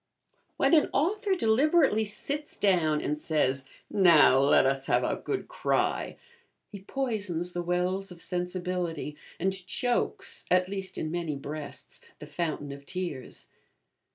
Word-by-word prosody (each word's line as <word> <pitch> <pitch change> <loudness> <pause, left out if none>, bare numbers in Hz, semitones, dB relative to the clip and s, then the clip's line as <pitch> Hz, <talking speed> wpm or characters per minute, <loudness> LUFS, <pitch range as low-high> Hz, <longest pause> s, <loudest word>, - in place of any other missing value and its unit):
When - - +3
an 310 - +5
author 390 - +1
deliberately 270 - +3
sits 285 +8 -3
down 165 -6 +2
and 150 +1 -1
says, 140 -4 0 0.2
'Now, 170 -8 +6
let 140 -1 +5
us 135 0 0
have - - +3
a - - 0
good 405 - -4
cry,' - - -1 0.5
he 200 - -8
poisons 200 -7 -3
the 175 - -3
wells 180 +2 -1
of 175 - -11
sensibility 180 -4 -3 0.2
and 190 +2 +1
chokes, 245 +4 -1
at 180 0 +3
least 195 -1 -4
in 155 - -3
many 170 -3 -2
breasts, 145 +2 -7 0.2
the - - -9
fountain 155 -4 -3
of 140 0 -9
tears. 170 -5 -4
180 Hz, 135 wpm, -28 LUFS, 155-210 Hz, 0.5 s, Now